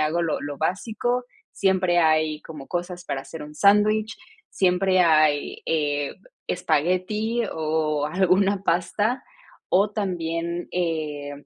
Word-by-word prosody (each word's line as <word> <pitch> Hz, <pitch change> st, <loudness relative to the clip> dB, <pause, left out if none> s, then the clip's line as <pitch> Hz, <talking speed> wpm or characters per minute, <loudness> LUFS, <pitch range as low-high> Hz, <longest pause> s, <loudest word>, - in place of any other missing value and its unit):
hago 155 Hz, +3 st, +1 dB
lo 165 Hz, -3 st, -1 dB
lo 145 Hz, -1 st, -5 dB
básico, 230 Hz, -, -1 dB, 0.3 s
siempre 185 Hz, -2 st, +2 dB
hay 155 Hz, -2 st, +2 dB
como 150 Hz, -4 st, -10 dB
cosas 175 Hz, 0 st, -4 dB
para 135 Hz, -5 st, -3 dB
hacer 160 Hz, +1 st, -9 dB
un 150 Hz, 0 st, -10 dB
sándwich, 210 Hz, +2 st, +3 dB, 0.3 s
siempre 185 Hz, 0 st, +2 dB
hay, 155 Hz, -4 st, +3 dB
eh, 145 Hz, -3 st, 0 dB, 0.3 s
espagueti 185 Hz, +8 st, 0 dB
o 155 Hz, -2 st, 0 dB
alguna 190 Hz, +3 st, +2 dB
pasta, 200 Hz, +8 st, 0 dB, 0.5 s
o 200 Hz, +3 st, +3 dB
también, 170 Hz, -4 st, -3 dB
eh, 155 Hz, -5 st, -2 dB
175 Hz, 115 wpm, -24 LUFS, 155-195 Hz, 0.5 s, sándwich